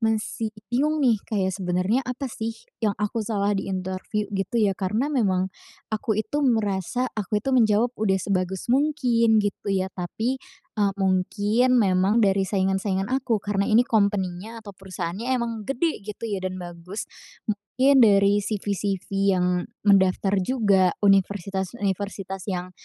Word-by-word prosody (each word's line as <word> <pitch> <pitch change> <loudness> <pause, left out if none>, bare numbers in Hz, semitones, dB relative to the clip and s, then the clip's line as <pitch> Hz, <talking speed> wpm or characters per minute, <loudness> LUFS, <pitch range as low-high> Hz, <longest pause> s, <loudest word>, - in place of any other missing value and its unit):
masih 220 0 -1 0.2
bingung 300 +5 +2
nih 235 -5 +4
kayak 190 -3 0
sebenarnya 185 +5 0
apa 255 +2 -4
sih, 225 0 -4 0.2
yang 210 -2 0
aku 210 +2 -2
salah 205 -2 0
di 195 0 -2
interview 190 +3 -3
gitu 195 +4 -2
ya. 210 -3 +3
Karena 210 +10 -1
memang, 190 -7 +1 0.4
aku 220 -1 -1
itu 220 +7 -1
merasa, 220 -2 0
aku 210 0 -2
itu 270 - 0
menjawab 230 0 +3
udah 195 -3 +2
sebagus 190 -1 -2
mungkin 250 -6 +3
gitu 205 0 -3
ya. 190 -1 0
Tapi, 225 +9 -3 0.4
eee, 200 -1 +2
mungkin 205 +5 +1
memang 195 -2 +3
dari 195 -1 +2
saingan-saingan 190 0 0
aku, 255 -4 +1
karena 200 -1 0
ini 225 +2 +5
company-nya 205 0 -1
atau 205 - -8
perusahaannya 190 +2 -6
emang 235 -1 -2 0.2
gede 310 +5 0
gitu 210 +3 -8
ya 200 - -1
dan 185 0 -4
bagus. 175 +4 -7 0.5
Mungkin 255 +7 +2
dari 200 -1 +5
CV-CV 200 -2 -2 0.3
yang 180 0 +1 0.2
mendaftar 195 0 +4
juga, 200 -6 +3
universitas-universitas 195 0 0
yang 180 -1 -3
205 Hz, 140 wpm, -24 LUFS, 190-225 Hz, 0.5 s, ini